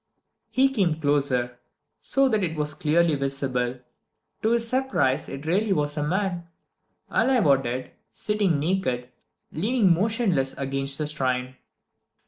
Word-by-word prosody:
He 265 +1 +3
came 190 -12 0
closer, 135 -5 0 0.4
so 270 0 +2
that 215 -5 +1
it 165 -2 -2
was 150 -1 0
clearly 160 +2 +2
visible. 135 -3 -2 0.6
To 220 - +1
his 235 -1 +2
surprise 250 - 0
it 135 +2 -7
really 195 +5 +1
was 145 -3 -1
a 150 - -2
man, 175 +2 -1 0.6
alive 255 -7 +2
or 140 -2 +6
dead, 125 0 -4 0.2
sitting 205 -7 0
naked, 140 -7 -1 0.4
leaning 205 +2 +2
motionless 190 - 0
against 135 0 -1
the 150 - -2
shrine. 130 -3 -2
150 Hz, 130 wpm, -25 LUFS, 135-200 Hz, 0.6 s, or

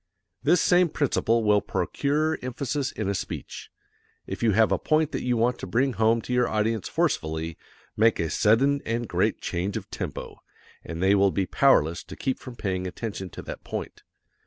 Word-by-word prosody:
This 165 +6 +4
same 180 -1 +4
principle 115 -6 +1
will 105 -1 +4
procure 155 +3 -1
emphasis 135 +2 -2
in 110 - -4
a 100 - 0
speech. 95 - -6 0.6
If - - -6
you 110 -3 +3
have 110 +2 +4
a - - +2
point 155 -1 +1
that - - -3
you 125 -1 0
want 120 +2 +1
to - - -6
bring 130 +2 +1
home 110 +2 +2
to 125 - -4
your 125 -1 +3
audience 110 -1 0
forcefully, 80 +1 -1 0.4
make 115 +1 +3
a 80 -2 -1
sudden 130 +6 +3
and 115 +1 -2
great - - 0
change 95 +3 -2
of - - -8
tempo, - - -6 0.4
and 85 +2 -5
they 95 +1 +5
will 100 0 +4
be 95 0 0
powerless 85 - +3
to - - -9
keep 130 -1 -2
from 125 - -9
paying 95 -4 -2
attention 95 0 -5
to - - -9
that - - -8
point. - - -6
115 Hz, 185 wpm, -26 LUFS, 100-130 Hz, 0.6 s, they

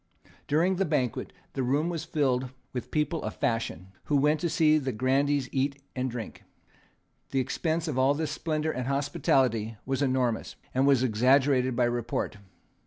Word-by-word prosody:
During 175 +5 +2
the 195 - +2
banquet 130 -8 -1 0.2
the 135 - -2
room 140 +6 +1
was 165 -2 -3
filled 130 -5 0 0.2
with 125 - -4
people 155 +1 0
of - - -4
fashion, 115 -5 -2 0.2
who 145 - +2
went 150 +2 +3
to 170 - -1
see 155 -1 +4
the 135 -2 -2
grandees 135 +3 +1
eat 140 +1 -1 0.2
and 130 0 -1
drink. 120 -2 -7 0.9
The 135 - 0
expense 160 +5 -1
of 135 -4 -1
all 135 +2 +4
this 155 0 -2
splendour 155 0 -1
and 125 -2 -4
hospitality 130 -5 +1
was 135 +1 -1
enormous, 130 -4 0 0.2
and 130 +2 +3
was 135 -3 +4
exaggerated 130 +2 +3
by 125 - +2
report. 120 -3 -2
135 Hz, 165 wpm, -28 LUFS, 125-150 Hz, 0.9 s, see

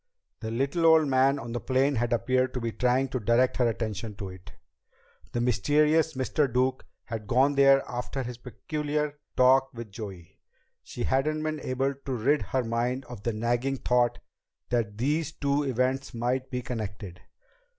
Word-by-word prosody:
The 110 - -5
little 140 +8 +1
old 160 -1 +6
man 135 +1 +3
on 120 -4 -6
the 120 - -2
plane 135 +3 +1
had 120 +1 0
appeared 130 +3 +1
to - - -1
be 115 -1 -2
trying 125 +3 +1
to 130 - -2
direct 120 +4 +2
her 125 - +3
attention 110 -1 -4
to 100 -1 -6
it. 95 -1 -12 0.8
The 120 - -2
mysterious 150 +6 +2
Mr. 130 +1 0
Duke 130 +2 0 0.2
had 110 -3 -6
gone 135 +5 +3
there 135 0 +5
after 125 +2 -4
his 120 0 -7
peculiar 150 +3 -3 0.2
talk 130 +1 +5
with 115 -3 -8
Joey. 95 -6 -9 0.4
She - - -6
hadn't 155 +4 0
been 155 -1 -2
able 135 +2 -1
to 135 -1 -6
rid 135 +6 +2
her 130 -1 -1
mind 120 +3 -1
of 120 -4 -9
the 115 - -1
nagging 120 +5 0
thought 125 -1 +2 0.5
that 110 -4 -1
these 145 +5 0
two 140 0 0
events 130 -1 -1
might 125 +3 -1
be 125 -2 -3
connected. 100 -6 -6
130 Hz, 170 wpm, -27 LUFS, 115-135 Hz, 0.8 s, old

